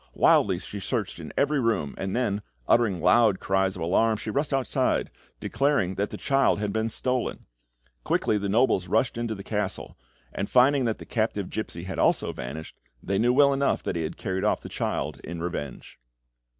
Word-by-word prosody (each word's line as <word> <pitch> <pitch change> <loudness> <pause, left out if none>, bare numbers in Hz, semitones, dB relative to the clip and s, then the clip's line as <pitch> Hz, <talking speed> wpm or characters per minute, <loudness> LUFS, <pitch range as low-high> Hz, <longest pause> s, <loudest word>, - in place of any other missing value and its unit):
Wildly 95 -3 +4
she 100 +2 -7
searched 105 -3 -3
in 80 - -8
every 145 0 +2
room, 115 - 0
and 95 +1 -3
then, 105 -5 0 0.3
uttering 110 -7 +3
loud 100 +3 +4
cries 95 0 +1
of 90 - -5
alarm, 110 +6 +2
she 110 - -5
rushed 140 +5 -1
outside, 135 -3 0 0.3
declaring 135 -10 +1
that 100 +2 -2
the - - -7
child 135 -6 +2
had 105 -1 -2
been 110 0 0
stolen. 125 +2 -2 0.6
Quickly 105 - +1
the 100 0 -2
nobles 110 -4 +2
rushed 110 +6 +1
into 115 -1 -2
the 100 - -8
castle, - - -3 0.4
and 100 - -3
finding 130 +1 +4
that 115 -2 0
the - - -10
captive 110 -4 -2
gipsy 85 -6 -4
had 95 +1 -5
also - - +2
vanished, 80 +6 -7 0.3
they 95 +1 0
knew 120 +2 +3
well 140 +2 +5
enough 140 0 0
that - - -2
he 85 - -1
had 80 0 -4
carried 95 0 -3
off 105 - +1
the - - -9
child - - -3
in 85 -1 -6
revenge. 85 -6 -6
105 Hz, 190 wpm, -26 LUFS, 95-125 Hz, 0.6 s, well